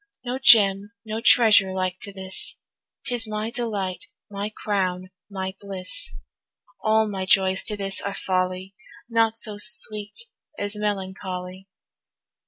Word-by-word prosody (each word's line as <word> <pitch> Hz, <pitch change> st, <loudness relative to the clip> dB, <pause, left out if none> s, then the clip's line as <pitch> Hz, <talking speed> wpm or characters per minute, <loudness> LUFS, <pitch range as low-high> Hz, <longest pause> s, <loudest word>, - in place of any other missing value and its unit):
No 250 Hz, +2 st, -3 dB
Gem, 205 Hz, -5 st, +6 dB
no 220 Hz, +1 st, -4 dB
treasure 215 Hz, -6 st, +6 dB
like 185 Hz, -1 st, -2 dB
to 200 Hz, -, -4 dB
this, 190 Hz, -1 st, -3 dB, 0.5 s
'Tis 240 Hz, -2 st, +1 dB
my 215 Hz, +1 st, -3 dB
delight, 210 Hz, -6 st, -3 dB, 0.2 s
my 200 Hz, +1 st, -3 dB
crown, 185 Hz, -3 st, -2 dB, 0.2 s
my 190 Hz, -1 st, -4 dB
bliss. 190 Hz, -, -3 dB, 0.7 s
All 220 Hz, 0 st, +3 dB
my 190 Hz, -2 st, -4 dB
joys 190 Hz, 0 st, +3 dB
to 210 Hz, -2 st, -2 dB
this 195 Hz, -1 st, 0 dB
are 200 Hz, 0 st, -4 dB
folly, 185 Hz, 0 st, -2 dB, 0.3 s
Naught 225 Hz, -1 st, +2 dB
so 215 Hz, -2 st, -2 dB
sweet 210 Hz, 0 st, +1 dB, 0.4 s
as 205 Hz, +1 st, -2 dB
melancholy. 190 Hz, -2 st, -4 dB
200 Hz, 125 wpm, -24 LUFS, 190-215 Hz, 0.7 s, Gem